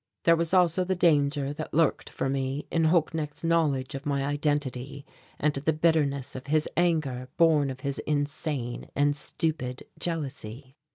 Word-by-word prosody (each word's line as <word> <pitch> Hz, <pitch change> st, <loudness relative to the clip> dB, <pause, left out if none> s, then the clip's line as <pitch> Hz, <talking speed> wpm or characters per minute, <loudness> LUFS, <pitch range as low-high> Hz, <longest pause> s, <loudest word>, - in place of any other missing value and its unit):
There 170 Hz, -, +6 dB
was 165 Hz, -1 st, -1 dB
also 180 Hz, -1 st, +4 dB
the 185 Hz, +1 st, 0 dB
danger 145 Hz, -4 st, +2 dB
that 155 Hz, 0 st, -6 dB
lurked 160 Hz, -2 st, +2 dB
for -, -, -2 dB
me 135 Hz, +1 st, -2 dB
in 165 Hz, -1 st, +2 dB
Holknecht's 160 Hz, -2 st, 0 dB
knowledge 155 Hz, -6 st, +1 dB
of 135 Hz, 0 st, -5 dB
my 140 Hz, -1 st, 0 dB
identity 145 Hz, -2 st, -2 dB, 0.3 s
and 150 Hz, 0 st, +2 dB
the 145 Hz, +3 st, 0 dB
bitterness 150 Hz, -4 st, +1 dB
of 130 Hz, +1 st, -7 dB
his 155 Hz, +1 st, +2 dB
anger 155 Hz, -8 st, +1 dB
born 155 Hz, -4 st, +4 dB
of 130 Hz, -1 st, -7 dB
his 140 Hz, 0 st, -3 dB
insane 145 Hz, -4 st, -2 dB
and 145 Hz, 0 st, +2 dB
stupid 140 Hz, -3 st, -2 dB, 0.2 s
jealousy. 135 Hz, -5 st, -4 dB
145 Hz, 155 wpm, -27 LUFS, 135-160 Hz, 0.3 s, There